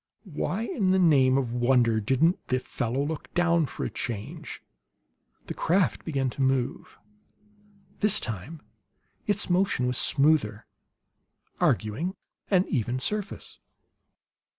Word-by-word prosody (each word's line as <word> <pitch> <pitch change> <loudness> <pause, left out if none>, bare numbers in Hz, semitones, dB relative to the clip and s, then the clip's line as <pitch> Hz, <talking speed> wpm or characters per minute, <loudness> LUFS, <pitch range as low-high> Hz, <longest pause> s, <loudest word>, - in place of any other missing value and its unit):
Why 190 +8 -2
in 200 -4 -1
the 190 - +4
name 135 -7 +4
of 125 -4 -1
wonder 120 -2 +3
didn't 135 - +1
the 130 - +1
fellow 125 +2 -2
look 155 0 -5
down, 170 -3 +3
for - - -5
a - - -2
change? 110 -4 -6 0.8
The - - -5
craft 185 +2 +1
began 135 -5 -1
to 140 - -5
move. 130 -2 -1 1.0
This 210 -1 +3
time 125 - -6 0.6
its 205 -1 0
motion 180 -7 +1
was 125 0 +2
smoother 140 -7 +2 0.9
arguing 145 - 0 0.3
an 190 -2 +3
even 125 -2 -1
surface. 205 +8 -4
135 Hz, 120 wpm, -27 LUFS, 125-175 Hz, 1.0 s, the